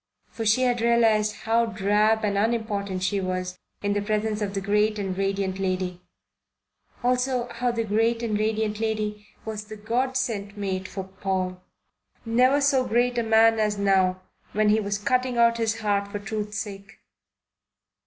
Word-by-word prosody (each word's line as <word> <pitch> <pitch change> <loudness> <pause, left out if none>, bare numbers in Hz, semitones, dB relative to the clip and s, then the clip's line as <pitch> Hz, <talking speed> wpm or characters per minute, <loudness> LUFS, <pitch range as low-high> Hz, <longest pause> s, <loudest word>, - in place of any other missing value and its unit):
For 225 -1 -3
she 225 +5 +4
had 245 -2 +1
realized 225 -2 +2
how 230 +1 +2
drab 215 +1 +2
and 200 -1 0
unimportant 205 -3 -1
she 200 +1 0
was 185 0 -3 0.2
in 205 0 +1
the 205 - 0
presence 215 +1 -1
of 200 -1 -2
the - - 0
great 210 +2 +1
and 195 -2 -3
radiant 195 0 -1
lady; 185 -2 -2 1.0
also 250 0 +1
how 245 +1 -1
the 230 -1 -1
great 225 +2 +1
and 220 -2 -1
radiant 215 0 -1
lady 215 -1 -2 0.2
was 215 -1 -5
the 215 0 -9
God 245 +5 -1
sent 210 -6 -3
mate 190 -2 -3
for 190 - -5
Paul, 190 -1 -3 0.6
never 255 +5 +3
so 275 -2 +3
great 240 +1 +1
a - - +2
man 225 0 +4
as 210 -1 +1
now 190 -2 +2 0.3
when 215 0 +3
he 215 +1 +4
was 200 -1 -2
cutting 250 +4 0
out 235 0 +4
his 225 0 -1
heart 200 -1 0
for 205 - -3
truth's 210 0 -4
sake. 200 -2 -7
215 Hz, 165 wpm, -25 LUFS, 200-230 Hz, 1.0 s, she